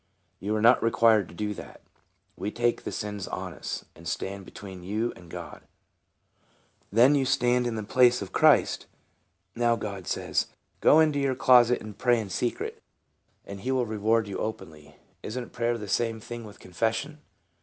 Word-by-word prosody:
" - - -45
You 105 +2 -2
are 110 - -1
not 120 +2 +6
required 115 -4 +4
to - - -13
do 105 +3 -2
that. - - -11 0.5
We 100 - -3
take 120 +2 -1
the - - -3
sins 105 -3 -4
on - - -5
us, - - -6
and 85 +1 -11
stand 95 +5 -4
between 95 -2 -10
you 110 +6 -2
and 85 -1 -15
God." - - -8 0.7
" - - -38
Then 120 +7 +6
you 140 -2 +3
stand 125 -1 +2
in 115 - -2
the 110 - -3
place 125 +3 +4
of 100 - -7
Christ. - - +3 0.7
Now 120 0 +2
God 100 -4 -6
says, - - -1 0.2
' - - -43
Go 155 - +6
into 155 -2 +3
your 135 -2 +1
closet, 125 -1 +5
and 105 -2 -9
pray 120 -2 +3
in 105 -4 -6
secret, 120 +4 -3 0.6
and 100 0 -8
he 130 +7 -2
will 130 -2 +1
reward 110 0 +1
openly.' 80 -8 -6 0.3
Isn't 120 +3 -6
prayer 120 0 0
the 105 -2 -7
same 115 +2 0
thing 120 +1 -8
with 105 - -13
confession?" 115 - -2
115 Hz, 180 wpm, -27 LUFS, 100-120 Hz, 0.7 s, not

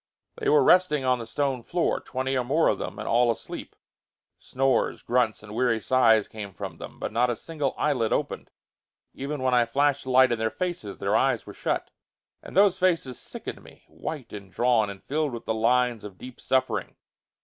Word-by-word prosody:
They 435 -3 -1
were 450 +1 +5
resting 180 -7 +4
on 130 -1 +2
the 115 - -7
stone 135 0 -1
floor, 170 +8 0
twenty 130 +1 -3
or 130 - +1
more 150 +7 +2
of - - 0
them, - - -5
and 105 - -6
all 120 +1 +3
asleep. 115 - -5 0.6
Snores, 130 -1 0
grunts 120 -3 +1
and 105 -1 -10
weary 120 -1 +1
sighs 110 -2 +4
came 100 -4 -8
from 95 -4 -6
them, - - -9
but - - -4
not 120 +3 +2
a 120 - 0
single 150 0 -3
eyelid 125 -7 +1
opened. - - -2 0.6
Even 140 0 -4
when 130 -1 +2
I 120 -1 +4
flashed 140 +3 +1
the - - -5
light 130 0 +5
in 120 - 0
their 110 0 +1
faces 175 - -4
their - - 0
eyes - - +2
were - - -9
shut. - - -2 0.5
And - - -8
those 195 -2 +5
faces 165 -9 +1
sickened - - -7
me; - - -17
white 140 -7 -7
and 100 -2 -9
drawn 120 -2 +2
and 100 -1 -9
filled 150 -1 -1
with 115 - -7
the 110 - 0
lines 120 0 +2
of 100 -3 -9
deep 125 +3 -11
suffering. 130 -1 0
125 Hz, 200 wpm, -26 LUFS, 115-140 Hz, 0.6 s, were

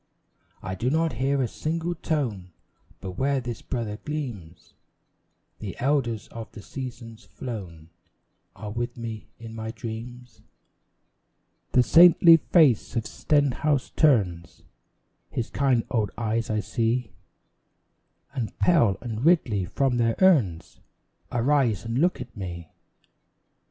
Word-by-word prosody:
I 95 - -4
do 115 +7 -1
not 160 +1 +1
hear 135 +3 0
a - - 0
single 165 +6 -3
tone; 120 - -3 0.5
But 95 -2 -7
where 140 0 +1
this 120 -3 -6
brother 115 -5 -4
gleams, 120 - -6 0.9
The 100 -5 -7
elders 125 -5 0
of 115 -1 -8
the 105 - -10
seasons 115 -4 -8
flown 95 -6 -8 0.6
Are 105 -1 -7
with 120 +2 -4
me 115 -2 -6
in 115 -1 -10
my 110 0 -5
dreams. 120 +1 -8 1.3
The 125 - +5
saintly 170 +2 +8
face 150 - +3
of 115 -1 -1
Stenhouse 145 -1 0
turns 95 - +1 0.7
His 115 - -4
kind 130 -4 +2
old 110 -4 +1
eyes 115 0 -1
I 110 -1 0
see; 115 +2 -1 1.2
And 125 -6 -4
Pell 120 - +3
and 115 -1 -5
Ridley 130 - +3
from 125 +6 0
their 115 -1 +2
urns 130 - +2 0.5
Arise 125 -4 +1
and 115 +2 -1
look 175 +4 +2
at 125 -1 -9
me. 85 -5 -7
120 Hz, 120 wpm, -25 LUFS, 110-140 Hz, 1.3 s, saintly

